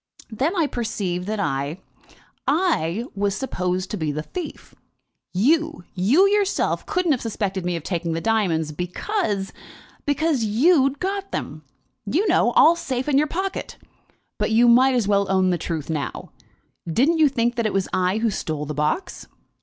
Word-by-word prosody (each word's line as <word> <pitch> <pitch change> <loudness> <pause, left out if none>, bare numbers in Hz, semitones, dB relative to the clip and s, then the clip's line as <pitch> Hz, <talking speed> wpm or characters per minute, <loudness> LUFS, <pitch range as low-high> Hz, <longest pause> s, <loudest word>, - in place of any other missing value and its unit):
"Then 275 - -1
I 335 -4 +2
perceived 195 -8 -3
that 215 0 -2
I 140 -3 -2 0.7
I 275 - +1
was 200 0 -1
supposed 185 -5 -2
to 210 - -2
be 155 -4 -1
the 150 +1 -4
thief. 350 - -7 0.6
You 310 - +1
you 235 - +4
yourself 405 -1 0
couldn't 365 -5 +1
have 260 - +1
suspected 200 -4 -3
me 180 -1 -1
of 165 - -5
taking 170 -2 -2
the 165 - -1
diamonds, 170 -7 0
because 195 - -2 0.5
because 290 -3 +1
you'd 270 - +3
got 390 +3 -3
them, 155 +2 -5 0.4
you 350 - +1
know, 350 -9 +3
all 330 +2 +6
safe 265 -6 -3
in 280 -2 +3
your 305 - +2
pocket. 380 +5 -4 0.6
But - - +1
you 230 +2 +4
might 255 +2 +5
as 235 -5 +1
well 200 -1 +2
own 190 -1 +3
the 175 - 0
truth 160 -2 -4
now. 155 -4 -4 0.6
Didn't 300 - +2
you 305 -2 +6
think 240 -2 0
that 235 -3 0
it - - -3
was 195 -1 0
I 185 +2 +1
who 225 0 +1
stole 155 -5 -3
the 150 - -4
box?" 150 - -2
220 Hz, 170 wpm, -23 LUFS, 180-305 Hz, 0.7 s, all